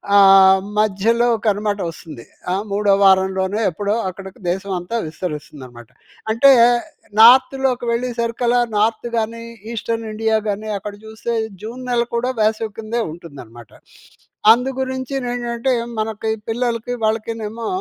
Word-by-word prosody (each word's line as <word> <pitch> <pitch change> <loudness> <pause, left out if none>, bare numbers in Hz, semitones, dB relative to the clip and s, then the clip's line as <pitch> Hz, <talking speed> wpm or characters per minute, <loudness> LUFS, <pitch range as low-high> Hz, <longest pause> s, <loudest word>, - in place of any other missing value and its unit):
ఆహ్, 195 -1 +7 0.2
మధ్యలో 215 +3 +2 0.2
కనమాట 205 0 0
ఒస్తుంది. 155 -7 -12 0.3
ఆ! - - +1 0.2
మూడో 205 0 +1
వారంలోనే 190 +2 +2
ఎప్పుడో 200 +4 -2 0.2
అక్కడికి 190 +1 -11
దేశమంతా 190 +2 -3
విస్తరిస్తుందనమాట. 145 -7 -8 0.4
అంటే 275 +5 +6 0.7
నార్త్‌లోకి 255 +1 +5
వెళ్ళే 245 +2 -1
సరికిలా 235 +1 +1 0.2
నార్త్ 220 +2 +1
గాని, 225 +1 -2 0.3
ఈస్టర్న్‌ఇండియా 225 -1 -2
గాని 215 +2 -4
అక్కడ 205 +1 -7
చూస్తే 220 +2 -5 0.3
జూన్ 240 +4 -7
నెల 240 -1 +2
కూడా 250 +2 0
వేసవి 215 0 0
కిందే 225 +2 -3
ఉంటుందనమాట. 130 -9 -12 0.8
అందు 250 +3 -2
గురించి 260 +1 -4
నెంటంటే 240 +1 -1 0.3
మనకి 220 0 -2 0.2
పిల్లలకి, 235 0 -2
వాళ్ళకి 220 +1 -1
నేమో 225 +2 -5
220 Hz, 115 wpm, -19 LUFS, 195-235 Hz, 0.8 s, ఆహ్